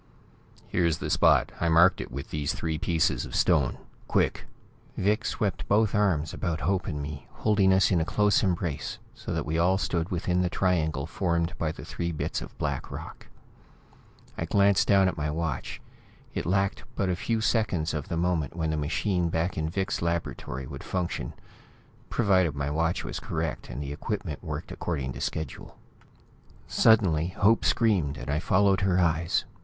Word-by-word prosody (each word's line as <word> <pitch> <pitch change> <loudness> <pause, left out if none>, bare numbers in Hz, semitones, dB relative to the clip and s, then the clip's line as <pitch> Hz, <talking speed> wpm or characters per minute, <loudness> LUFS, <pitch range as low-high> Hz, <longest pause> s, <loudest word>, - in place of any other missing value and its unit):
"Here's 85 -3 +1
the - - -4
spot! - - +4
I 85 - +1
marked 85 +3 +5
it - - -8
with 70 +2 -6
these 75 -2 -1
three 80 -1 -2
pieces 80 -1 +1
of - - -7
stone. - - +3 0.3
Quick!" - - 0 0.5
Vic 105 +4 +1
swept 90 -4 -2
both 105 +1 +3
arms 95 -8 +1
about 85 -4 -2
Hope 90 +4 0
and 75 -5 -3
me, 70 -2 -7
holding 100 -3 +2
us 95 +1 +4
in 85 -3 +3
a - - +2
close 105 +4 +2
embrace, 85 -6 -1 0.2
so - - -7
that - - -1
we 80 +3 -1
all 90 +3 +3
stood 85 -3 -1
within 90 0 0
the 90 - +1
triangle 80 -7 0
formed 85 -1 -1
by 80 -2 0
the - - -9
three 85 0 -3
bits 80 - -3
of - - -10
black - - -2
rock. - - -9 1.1
I 80 - -1
glanced 100 +2 +3
down 100 -2 +5
at 95 - -2
my 75 0 -1
watch. 80 -3 -3 0.5
It - - -3
lacked 95 +2 +1
but 100 - 0
a 90 - +1
few 115 +5 -1
seconds 100 -8 +1
of 75 -3 -3
the 85 - -2
moment 85 -4 0
when 80 -2 -1
the 80 - -1
machine 85 +4 0
back 85 +2 -1
in 80 0 -1
Vic's 95 +2 -2
laboratory 85 -6 -3
would 70 +1 -8
function 90 -9 -3 0.8
provided 95 -8 +2
my 70 0 -2
watch 80 +3 0
was - - -4
correct, - - -3
and 60 +4 -5
the 70 0 -5
equipment 75 0 -4
worked - - -5
according 70 -7 -3
to - - -7
schedule. 80 - -5 0.9
Suddenly, 95 -8 +4
Hope 100 +5 +3
screamed, 90 -11 +2
and 70 - -4
I 75 - +1
followed 95 +3 +3
her 95 -1 +2
eyes. 85 -1 +1
85 Hz, 175 wpm, -27 LUFS, 80-95 Hz, 1.1 s, marked